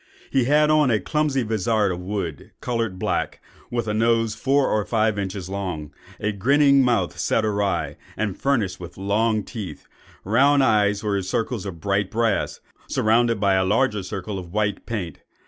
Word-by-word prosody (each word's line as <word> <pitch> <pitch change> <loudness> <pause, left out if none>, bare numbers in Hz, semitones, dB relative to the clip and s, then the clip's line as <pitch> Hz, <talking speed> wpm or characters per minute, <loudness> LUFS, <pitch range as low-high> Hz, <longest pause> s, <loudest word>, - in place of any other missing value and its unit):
He 130 -3 +2
had 150 +3 +4
on 155 -3 +4
a 110 -3 +2
clumsy 150 -3 0
vizard 110 -1 +1
of 90 - -4
wood, 90 -5 -4
coloured 115 -6 -2
black, - - -2 0.3
with 120 -2 -2
a 105 - 0
nose 115 0 +2
four 135 +5 +2
or 105 -1 +1
five 110 +1 +1
inches 95 -2 -4
long, 90 -7 -5 0.3
a 105 - 0
grinning 140 +6 +4
mouth 115 -8 0
set 110 - +1
awry, 100 -4 -1 0.2
and 105 -4 -1
furnished 115 -10 0
with 90 -1 -10
long 105 +2 +1
teeth; 100 - -7 0.4
round 135 +7 +4
the - - +4
eyes 105 -2 +2
were 100 -2 0
circles 105 +2 -2
of 85 -4 -7
bright 100 -1 0
brass, 115 -2 0 0.3
surrounded 115 0 +2
by 100 -1 +3
a 95 0 +3
larger 105 +2 +1
circle 95 +1 -5
of 90 -2 -10
white 105 0 -1
paint. 95 -9 -4
105 Hz, 170 wpm, -23 LUFS, 95-115 Hz, 0.4 s, had